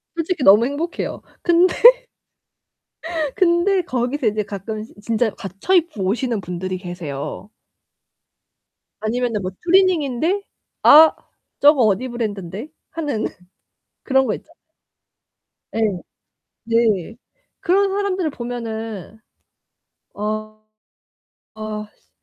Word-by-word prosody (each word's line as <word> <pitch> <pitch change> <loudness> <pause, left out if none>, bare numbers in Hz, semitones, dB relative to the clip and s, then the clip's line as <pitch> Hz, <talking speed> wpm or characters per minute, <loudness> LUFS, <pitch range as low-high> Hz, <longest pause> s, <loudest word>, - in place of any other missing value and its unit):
솔직히 335 -2 -2
너무 210 +3 +7
행복해요. 295 +6 -3 0.2
근데, 350 +1 +4 1.6
근데 365 +2 +3
거기서 250 -1 -2
인제 215 0 +1
가끔씩 215 +2 -7
진짜 225 +1 +1
갖춰 195 - -3
입고 330 - +1
오시는 230 +3 -1
분들이 185 +1 -4
계세요. 175 0 -6 1.5
아니면은 230 -1 -1
뭐 185 0 -4
추리닝인데 350 -2 +2 0.4
'아 315 +2 +9 0.5
저거 290 -2 +6
어디 215 +4 +1
브랜든데' 215 - -5 0.2
하는 295 -9 -2 0.8
그런 265 -1 +2
거 215 - 0
있쟎아요. 330 - -12 1.2
예. - - -1 0.9
네. 225 -3 +1 0.4
그런 395 +1 +2
사람들을 385 -4 -1
보면은 225 - -6 1.0
어 215 +1 -4 0.9
아 215 -1 -5
씨 - - -40
235 Hz, 210 characters per minute, -20 LUFS, 210-320 Hz, 1.6 s, 아